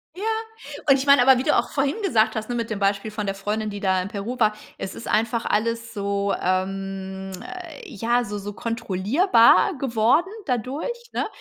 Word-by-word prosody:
Ja. 390 - -7 0.7
Und 275 - +7
ich 265 - -2
meine 280 -2 +7
aber, 260 0 +6
wie 255 - -1
du 300 - +3
auch - - +1
vorhin 275 +1 0
gesagt 220 - +2
hast, 220 +1 -4
ne, 245 - -2
mit 230 -1 -2
dem 215 -2 -3
Beispiel 200 +2 0
von 210 -1 -4
der 195 - -1
Freundin, 210 +2 -2
die 205 0 -6
da 190 -2 +1
in 180 - -4
Peru 215 +5 -5
war. 215 -1 +4 0.2
Es 190 - -6
ist - - -8
einfach 230 +2 0
alles 230 +2 -1
so 200 0 -1
ähm, 190 +1 -2
äh, 365 +4 -9
ja, 240 - 0
so 205 -1 -5
so 205 +1 -6
kontrollierbar 230 - +3
geworden 255 - +2
dadurch, 290 - -3
ne? - - -1
220 Hz, 195 wpm, -23 LUFS, 200-255 Hz, 0.7 s, Und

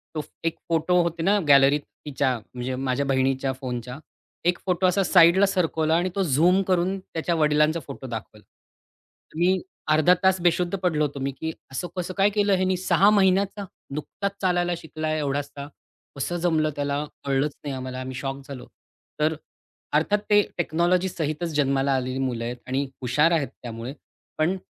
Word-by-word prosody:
तो 155 - -1 0.2
एक 165 0 -1
फोटो 170 +2 +3
होते 170 -1 -3
ना 205 +2 +3
गॅलरीत 140 +1 +6 0.2
तिच्या 130 -3 0 0.2
म्हणजे 125 +1 -3
माझ्या 135 +1 -1
बहिणीच्या 135 0 +1
फोनच्या 125 0 -6 0.5
एक 175 - +1
फोटो 180 0 +1
असा 190 +2 +2
साईडला 180 +2 +6
सरकवला 165 -4 +1
आणि 180 +2 +1
तो 195 - +1
झूम 175 +6 +3
करून 185 +1 +1
त्याच्या 170 -1 -3
वडिलांचा 150 +1 +3
फोटो 135 -1 -8
दाखवला. 110 -2 -7 0.9
मी 180 +3 +2 0.3
अर्धा 155 +3 +5
तास 190 -1 +4
बेशुद्ध 175 +2 +1
पडलो 160 -5 +1
होतो, 140 -1 -5
मी 135 +1 -2
की 160 0 -2 0.2
असं 175 +7 -3
कसं 180 +1 -3
काय 195 +1 +4
केलं 205 -1 +2
ह्यानी 185 0 +1
6 190 +2 +4
महिन्याचा 200 0 +2 0.3
नुकताच 195 +6 -3
चालायला 175 -1 +1
शिकला 155 -1 -4
एवढासा. 140 -1 -3 0.5
कसं 175 +6 -2
जमलं 160 -3 +1
त्याला 145 +1 -1 0.2
कळलंच 140 +1 0
नाही 140 -2 -4
आम्हाला 130 0 -5
आम्ही 130 0 -6
शॉक 135 +1 -4
झालो. 135 -3 -8 0.6
तर 155 +1 +2 0.6
अर्थात 180 +7 +2
ते 205 0 +6 0.2
टेक्नॉलॉजीसहितच 170 -1 0
जन्माला 140 -1 +2
आलेली 130 0 -2
मुलं 120 -3 -2
आहेत 120 +1 -3
आणि 135 +2 0 0.2
हुशार 150 +7 +3
आहेत, 155 -5 +1
त्यामुळे 120 +2 -6 0.4
पण 170 +5 +1
155 Hz, 160 wpm, -25 LUFS, 135-180 Hz, 0.9 s, गॅलरीत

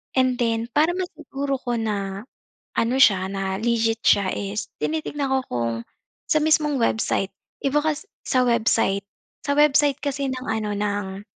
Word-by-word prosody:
And 255 -1 +2
then, 230 -1 0
para 320 +4 +3
masiguro 280 -6 -3
ko 245 -2 -2
na, 200 -2 -3 0.5
ano 235 +3 +1
siya, 190 -6 +5
na 195 -1 -2
legit 230 -1 +1
siya 200 -2 +4
is, 205 +1 -4
tinitingnan 300 -2 -2
ko 265 - +3
kung, 115 -1 -1 0.5
sa 310 - +3
mismong 305 -3 +2
website. 220 -4 +1 0.3
Iba 290 +2 +2
kas 315 +6 -2 0.2
sa 255 -1 +3
website 225 -4 +2 0.4
sa 285 -1 0
website 290 -1 +4
kasi 280 -1 -1
ng 255 0 -5
ano, 220 -1 -1
ng 205 -1 -3
235 Hz, 150 wpm, -23 LUFS, 205-285 Hz, 0.5 s, siya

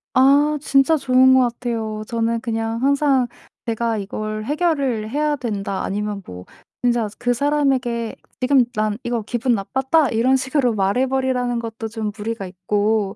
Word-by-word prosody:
아 285 +3 +4
진짜 275 +2 +3
좋은 260 -2 +4
거 260 - +6
같아요. 225 -3 -4
저는 230 0 0
그냥 225 -1 -2
항상 275 -2 +3 0.4
제가 230 -1 -1
"이걸 215 +1 -4
해결을 280 -7 0
해야 295 +3 0
된다." 200 -7 -3
아니면 205 0 -3
뭐 90 0 -9 0.4
진짜 240 -2 +2
그 245 0 0
사람에게 260 -4 0 0.2
"지금 260 0 +4
난 215 -1 0
이거 240 -2 -2
기분 240 +2 0
나빴다." 265 +8 +1
이런 235 +4 +2
식으로 265 -2 +1
말해 205 +6 +1
버리라는 255 -2 0
것도 225 -1 -5
좀 220 -1 -4
무리가 215 -1 -4
있고 205 +2 -1
235 Hz, 300 characters per minute, -21 LUFS, 215-265 Hz, 0.4 s, 거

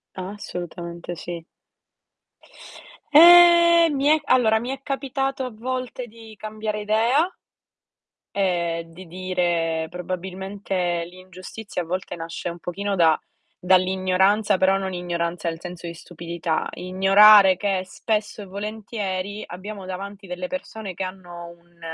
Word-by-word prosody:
Assolutamente 175 -3 -7
sì. 170 0 -7 1.7
Eh, 340 +1 +8
mi 280 0 -1
è 310 +1 +5
allora, 220 -3 +3
mi 240 +3 -5
è 270 0 -5
capitato 270 -1 -2
a - - -4
volte 255 +2 -5
di 225 -1 -14
cambiare 215 0 -4
idea 235 - +2 1.0
e 170 -4 0
di 175 +2 -13
dire: 170 -3 -1
"Probabilmente, 185 -1 -3
l'ingiustizia 185 +2 -8
a - - -6
volte 180 +1 -4
nasce 165 +1 -5
un 170 0 -8
pochino 200 +4 -3
da 165 -3 +4 0.4
dall'ignoranza", 190 +2 +2
però 190 +1 +3
non 190 -1 -4
ignoranza 170 -1 -2
nel 165 0 -6
senso 175 -1 -8
di 170 - -6
stupidità: 170 -1 -4
ignorare 195 +1 +6
che 195 -2 0
spesso 210 +2 -3
e - - -10
volentieri 205 -1 -5
abbiamo 195 +2 -8
davanti 195 +1 -7
delle 180 0 -5
persone 220 -8 -6
che 190 - -4
hanno 175 -2 -8
un 170 0 -20
190 Hz, 125 wpm, -23 LUFS, 175-215 Hz, 1.7 s, Eh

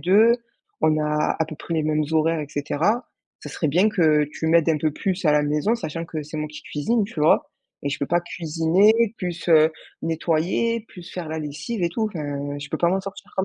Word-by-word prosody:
deux, 215 +6 +5 0.5
on 155 -1 +3
a 150 0 0
à 160 - +2
peu 160 - -8
près 170 - -5
les 155 - +1
mêmes 155 0 +1
horaires, 160 +1 +2
et 150 - -5
cetera. 155 - 0 0.3
Ça - - -8
serait 155 - -1
bien 180 +9 +4
que 155 -7 +3
tu 160 - -4
m'aides 165 0 +4
un 155 - +1
peu 155 +1 +1
plus 190 +4 -2
à 150 - +5
la 150 0 +4
maison, 150 +10 +1
sachant 165 -7 -4
que 155 -2 -5
c'est 155 +2 -8
moi 150 0 -3
qui 150 - -10
cuisine, 215 +10 0
tu 195 -7 -6
vois? 150 - +3 0.3
Et 140 - -1
je 140 - -3
peux 140 - -1
pas 175 +1 +2
cuisiner, 180 +7 +2
plus, 175 -2 -4
heu, 160 -1 +6 0.3
nettoyer, 170 +8 0
plus 180 -1 -11
faire 175 -4 -5
la 160 - -3
lessive 150 +8 -4
et 170 - +2
tout. 220 +3 -1
Enfin, 145 -5 -4
je 145 0 -7
peux - - -2
pas 170 - +3
m'en 190 +2 +1
sortir 195 +1 -9
comme 190 - +1
160 Hz, 230 wpm, -23 LUFS, 150-190 Hz, 0.5 s, heu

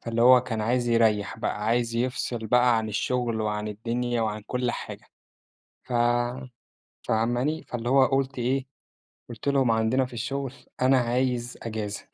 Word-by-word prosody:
فاللي 115 0 -1
هو 125 0 +8
كان 115 -3 -4
عايز 120 +2 0
يرَّيح 110 -3 +2
بقى، 105 - -2
عايز 115 +1 +1
يفصِل 120 -2 -2
بقى 125 0 +4
عن 110 -1 -3
الشغل 115 +1 -1
وعن 105 0 -2
الدنيا 120 +3 -2
وعن 105 -1 -2
كُلّ 125 -1 -1
حاجة، - - -7 0.8
ف - - -10 1.1
فاهماني، 120 +7 0
فاللي 120 0 -5
هو 135 0 +5
قُلت 135 0 -1
إيه، 130 +2 0 0.6
قُلت 120 +3 -8
لهم 135 -4 +3
عندنا 115 +4 +2
في 125 - -12
الشغل: 135 +2 -3 0.3
"أنا 130 +1 +5
عايز 125 0 -1
إجازة"، 110 -3 -5
120 Hz, 150 wpm, -26 LUFS, 110-125 Hz, 1.1 s, هو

